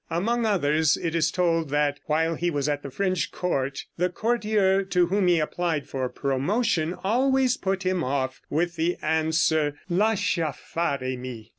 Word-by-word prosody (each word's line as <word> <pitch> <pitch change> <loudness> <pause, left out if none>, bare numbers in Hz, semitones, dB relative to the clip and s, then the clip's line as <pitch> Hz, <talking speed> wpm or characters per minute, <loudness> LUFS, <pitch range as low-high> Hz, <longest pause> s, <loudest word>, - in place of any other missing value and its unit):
Among 225 +7 0
others 155 -6 +2
it 165 -2 -3
is 165 -1 +2
told 165 -3 0
that 145 0 +1
while 160 +2 +1
he 175 +2 -1
was 145 -3 -1
at 145 -1 -1
the 140 - -7
French 185 +4 -1
court 135 -6 -2
the 180 +1 +1
courtier 210 -1 +1
to 180 -2 +2
whom 190 +2 +1
he 175 -1 +4
applied 160 -1 -1
for 130 -2 -3
promotion 165 - 0
always 255 +4 +2
put 190 0 -2
him 185 -2 0
off 130 0 -2
with 170 +2 -1
the 170 +2 0
answer, 160 -1 +1 0.2
"Lascia 195 -5 +1
fare 140 -6 -2
mi." 120 -4 -8
165 Hz, 160 wpm, -25 LUFS, 145-190 Hz, 0.2 s, he